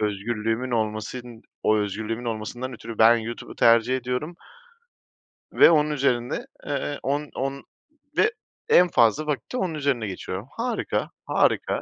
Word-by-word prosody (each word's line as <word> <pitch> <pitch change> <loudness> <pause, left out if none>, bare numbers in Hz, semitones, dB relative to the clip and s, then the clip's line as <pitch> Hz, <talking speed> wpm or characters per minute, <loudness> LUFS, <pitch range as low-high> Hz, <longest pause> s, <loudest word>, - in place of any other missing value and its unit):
özgürlüğümün 110 +4 -1
olmasın 115 +1 -3 0.2
o 110 - +3
özgürlüğümün 110 +3 -3
olmasından 120 +3 -4
ötürü 115 -1 -8
ben 115 +1 +7
YouTube'u 115 +1 -6
tercih 115 +2 +4
ediyorum 125 +7 -3 1.2
ve - - +7
onun 150 -2 +3
üzerinde, 130 -4 0 0.2
eee, 145 0 -3
on 145 +2 -1
on 135 +1 -3 0.5
ve 435 - +4 0.4
en 180 0 +7
fazla 120 +5 +3
vakit 150 -2 -3
de - - -1
onun 185 -7 -1
üzerine 140 -7 -1
geçiyorum. 95 +2 -6
Harika, 235 0 -2 0.2
harika. - - +1
120 Hz, 130 wpm, -25 LUFS, 110-140 Hz, 1.2 s, ben